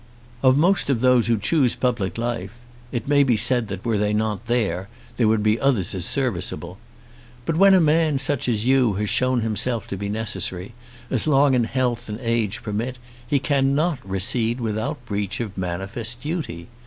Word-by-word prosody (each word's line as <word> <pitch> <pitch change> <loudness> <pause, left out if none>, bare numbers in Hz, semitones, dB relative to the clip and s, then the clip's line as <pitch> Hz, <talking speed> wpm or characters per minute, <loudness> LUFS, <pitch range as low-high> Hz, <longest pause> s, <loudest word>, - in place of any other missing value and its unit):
Of 130 0 +4
most 175 +1 +2
of 125 -5 +1
those 125 -2 +4
who 115 -1 +2
choose 130 +4 +2
public 120 -7 -1
life, 115 -3 -3 0.4
it 120 -1 -4
may 145 0 +4
be 125 -5 +3
said 120 +1 +2
that 100 -1 -7
were 110 -3 +1
they 105 0 +1
not 110 +1 -2
there, 100 -6 0 0.3
there 115 - +3
would 110 -1 +2
be 110 +2 +2
others 125 -10 +1
as 90 -3 -2
serviceable. 95 -7 -2 0.7
But 165 - -1
when 195 +3 +6
a - - +5
man 155 -2 +3
such 135 -1 0
as 110 -1 0
you 130 -4 +3
has 105 +1 -1
shown 130 -1 +2
himself 115 +1 -1
to 100 - -4
be 100 +1 -4
necessary, 100 -2 -2 0.4
as 130 +2 +1
long 140 -1 +4
as 120 -3 +2
health 125 -3 -1
and 105 +2 -5
age 115 -1 -1
permit 115 +4 -3 0.3
he 145 - +2
cannot 140 +3 +1
recede 110 +5 -1
without 110 +1 -3
breach 100 +2 -3
of 110 -5 -4
manifest 95 +6 -4
duty. 135 - -4
115 Hz, 180 wpm, -22 LUFS, 105-130 Hz, 0.7 s, when